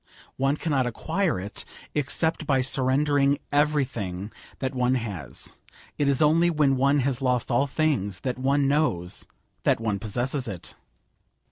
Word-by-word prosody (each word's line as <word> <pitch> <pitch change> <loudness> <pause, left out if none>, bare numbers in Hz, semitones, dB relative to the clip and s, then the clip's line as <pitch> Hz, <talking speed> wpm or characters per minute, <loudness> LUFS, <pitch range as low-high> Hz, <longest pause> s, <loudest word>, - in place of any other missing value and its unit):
One 135 +2 +1
cannot 140 -6 0
acquire 160 - -1
it, 100 +3 -6 0.3
except 155 +2 0
by 135 -2 +3
surrendering 140 +2 +2
everything 130 -10 0 0.3
that 130 +1 -3
one 125 0 +2
has. 110 -8 -4 0.4
It 145 - +2
is 140 +2 +3
only 165 +3 +4
when 150 -5 +3
one 140 +2 +3
has 130 -1 -1
lost 125 -1 +1
all 120 +4 +3
things, 130 - 0
that 125 -1 -3
one 140 +1 +2
knows 135 - 0 0.3
that - - +2
one 105 -3 -1
possesses 125 +5 -2
it. 95 -6 -7
135 Hz, 140 wpm, -26 LUFS, 120-145 Hz, 0.4 s, only